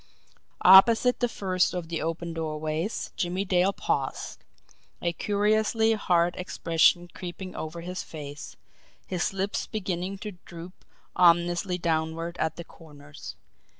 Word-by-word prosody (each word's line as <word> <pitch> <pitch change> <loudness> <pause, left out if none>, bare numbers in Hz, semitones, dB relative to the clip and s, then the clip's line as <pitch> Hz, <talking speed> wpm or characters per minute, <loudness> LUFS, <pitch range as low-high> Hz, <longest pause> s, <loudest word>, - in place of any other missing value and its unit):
Opposite 225 +6 +7
the 245 - +1
first 185 -4 0
of 175 -2 -4
the 165 - -3
open 165 +1 -3
doorways 155 +4 -3
Jimmie 185 +2 -2
Dale 185 +1 +3
paused - - -3 0.6
a 170 -1 -1
curiously 215 +4 +2
hard 175 -4 +1
expression 175 -1 +2
creeping 180 +1 -7
over 160 +2 -6
his 180 +2 -5
face, 145 -2 -9 0.5
his 180 -2 -1
lips 195 +1 -2
beginning 190 -2 -3
to 200 -2 -8
droop 175 +2 -11 0.3
ominously 175 +1 +3
downward 165 0 -2
at 160 0 -1
the 170 - -7
corners. 145 - -12
175 Hz, 120 wpm, -27 LUFS, 165-190 Hz, 0.6 s, Opposite